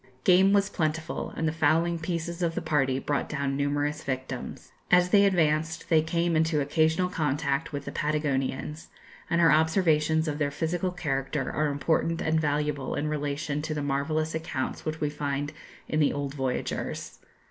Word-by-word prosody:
Game 190 +1 +6
was 200 0 +4
plentiful, 160 -3 -2
and 160 - 0
the - - +1
fowling 165 +2 +2
pieces 170 +1 -3
of 165 -1 0
the 180 - -1
party 140 -5 +1
brought 140 +1 -2
down 140 -1 -1
numerous 145 +2 -1
victims. 130 -1 -5 0.2
As 180 0 +5
they 200 -1 +6
advanced 160 -3 +1
they 160 -2 +5
came 170 +1 0
into 160 -1 +2
occasional 160 +5 +2
contact 150 -3 -1
with 145 -1 -5
the - - -5
Patagonians, 150 0 -2 0.4
and 170 - +2
her 165 -1 +6
observations 160 -1 +3
of 150 -1 -2
their 145 -1 +1
physical 170 +5 -1
character 140 -5 -2
are 155 0 0
important 160 +3 0
and 160 0 +1
valuable 150 -2 -1
in 150 - -1
relation 145 0 -2
to 155 0 -3
the 145 - -2
marvellous 155 +3 -1
accounts 160 -5 -3
which 155 0 -3
we 150 -1 -1
find 145 0 -3 0.3
in 155 - 0
the 150 - +3
old 140 -1 -3
voyagers. 130 -3 -3
155 Hz, 170 wpm, -27 LUFS, 145-165 Hz, 0.4 s, Game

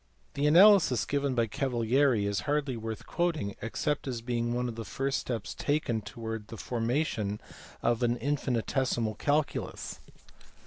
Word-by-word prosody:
The 145 +1 +1
analysis 175 - +6
given 140 -2 0
by 115 -1 +3
Cavalieri 120 0 +1
is 100 0 0
hardly 145 -3 +1
worth 110 -1 -5
quoting 160 - -1
except 140 +5 -2
as 120 -3 -3
being 120 -1 -1
one 125 +1 0
of 120 - -4
the 115 0 -6
first 135 +4 -1
steps 115 -5 -4
taken 145 -7 0
towards 110 0 -6
the 115 - -8
formation 115 -4 -1 0.4
of 120 0 +2
an 120 0 +2
infinitesimal 125 -3 0
calculus. 145 +6 -1
120 Hz, 140 wpm, -30 LUFS, 115-145 Hz, 0.4 s, analysis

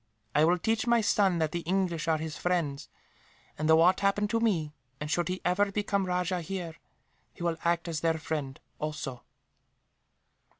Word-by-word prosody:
I 150 - +5
will 175 +2 +3
teach 220 +6 0
my 235 0 +5
son 195 -4 +3
that 160 -2 0
the 175 - -2
English 170 -2 -1
are 160 -1 +3
his 155 -1 -5
friends 165 -6 -1 0.7
and, 155 +1 -1
should 160 - +7
aught 180 +3 +5
happen 200 +1 +2
to 230 +1 +1
me, 170 -10 0 0.3
and 150 +1 -4
should 175 +2 +1
he 185 +1 -3
ever 200 +3 +2
become 200 -1 0
rajah 180 0 0
here, 175 -1 -5 0.6
he - - -7
will 170 -1 0
act 170 0 +1
as 165 -2 -2
their 165 +1 +1
friend, 150 -4 -4 0.2
also." 150 -5 -4
170 Hz, 175 wpm, -29 LUFS, 160-190 Hz, 0.7 s, should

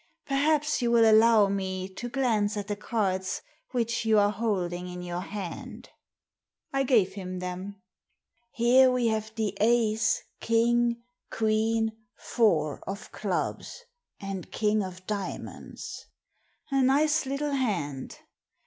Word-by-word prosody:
Perhaps 300 +1 +1
you 240 - +1
will 230 -1 +5
allow 220 -1 +6
me 190 -1 -2
to 195 +6 -7
glance 225 -5 +1
at 205 -1 -4
the 205 - -2
cards 195 -3 -2 0.3
which 235 -2 -1
you 220 -1 +3
are 205 0 +4
holding 185 -5 -2
in 180 0 -7
your 175 0 -4
hand?" 190 -3 -7 0.8
I 275 - +2
gave 225 -8 +3
him 185 -2 -6
them. 185 +2 -6 0.3
'* 240 - -48
Here 250 +3 +5
we 245 -2 +2
have 220 0 -2
the 215 -3 -1
ace, 220 -1 +2 0.2
king, 235 +1 +2 0.3
queen, 220 0 +1 0.3
four 160 - +1
of 200 +2 -6
clubs, 205 - -3 0.4
and 195 -3 -6
king 215 0 +1
of 185 -1 -7
diamonds. 205 -1 -6 0.6
A 270 0 +3
nice 295 +3 +3
little 285 +2 -2
hand. 170 - -2
215 Hz, 130 wpm, -28 LUFS, 190-240 Hz, 0.8 s, allow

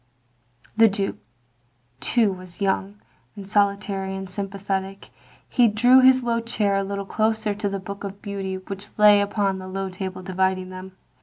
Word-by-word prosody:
The 225 0 +7
Duke 200 -1 -2 0.8
too 225 - +2
was 185 -2 -12
young, 200 +1 -1 0.4
and 200 -2 -9
solitary, 200 -1 0
and 190 0 -6
sym 195 +1 -4
pathetic. 195 0 -4 0.4
He 245 -2 +4
drew 245 +5 +5
his 260 0 +6
low 235 -1 0
chair 215 -3 0
a 195 - +1
little 200 0 -4
closer 215 +1 0
to 205 0 -2
the 195 - -3
Book 200 +1 -8
of 200 0 -6
Beauty 195 -2 -4
which 195 +2 -9
lay 210 -1 +7
upon 200 -1 0
the 185 - -8
low 195 0 -4
table 185 0 -6
dividing 185 0 -1
them. 185 0 -9
200 Hz, 165 wpm, -23 LUFS, 190-210 Hz, 0.8 s, The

